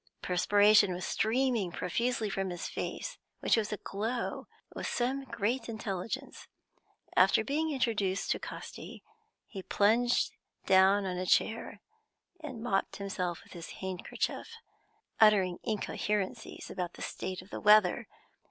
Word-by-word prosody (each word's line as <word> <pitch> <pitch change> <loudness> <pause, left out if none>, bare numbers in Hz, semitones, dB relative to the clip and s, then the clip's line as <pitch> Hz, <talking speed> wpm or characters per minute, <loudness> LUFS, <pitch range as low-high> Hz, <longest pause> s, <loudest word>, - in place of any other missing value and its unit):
Perspiration 205 +1 +5
was 180 - -4
streaming 225 -3 +1
profusely 225 +6 -1
from 195 -1 -2
his 175 -1 -4
face, - - -5 0.2
which - - +3
was 220 -2 -1
aglow 215 +4 -3 0.3
with - - -4
some 265 +3 -1
great 235 +1 -2
intelligence. 215 -3 -5 0.7
After - - +5
being 310 +3 0
introduced 210 -8 0
to - - 0
Casti, - - -8 0.4
he 195 - -8
plunged 230 +6 +2 0.3
down 195 +1 +5
on 180 -1 -2
a 185 - -3
chair, 225 +5 +1 0.6
and 265 -8 -7
mopped 195 -5 0
himself 185 -4 -3
with - - -16
his 170 -2 -8
handkerchief, 190 -1 -3 0.6
uttering 195 -5 +5
incoherencies 210 -2 -3
about 180 -1 -3
the - - -8
state 185 -1 -5
of 190 - -20
the - - -5
weather. 210 +1 +5
205 Hz, 125 wpm, -31 LUFS, 190-230 Hz, 0.7 s, Perspiration